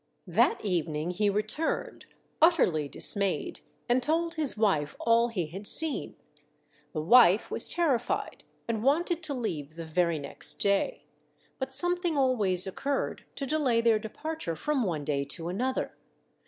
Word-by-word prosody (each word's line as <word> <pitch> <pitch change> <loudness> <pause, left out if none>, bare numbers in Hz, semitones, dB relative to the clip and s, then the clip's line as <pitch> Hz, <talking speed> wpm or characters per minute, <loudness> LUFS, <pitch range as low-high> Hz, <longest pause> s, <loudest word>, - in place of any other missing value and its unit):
That - - +1
evening 165 -3 -1
he 205 +3 0
returned, 215 - -3 0.3
utterly 180 - +3
dismayed, 200 - 0 0.3
and 245 +1 +2
told 330 +5 0
his 305 -8 +3
wife 175 -9 0
all 230 0 +3
he 200 -8 -3
had 190 +7 -7
seen. 320 -3 +3 0.8
The 155 - -4
wife 220 +1 +5
was - - +5
terrified, 280 -9 -1 0.2
and 225 -2 -2
wanted 335 +5 +1
to 300 -4 -2
leave 155 - -5
the 165 0 -7
very 170 0 0
next 140 -1 0
day. 200 - 0 0.6
But 265 0 -4
something 350 +1 +1
always 210 -9 +1
occurred 275 +9 -3
to 275 - -4
delay 270 -5 +1
their 230 -2 +3
departure 220 - -5
from 290 - -1
one 165 -9 -2
day 140 -2 -1
to 165 +4 -3
another. 255 +8 -2
230 Hz, 140 wpm, -28 LUFS, 175-285 Hz, 0.8 s, wife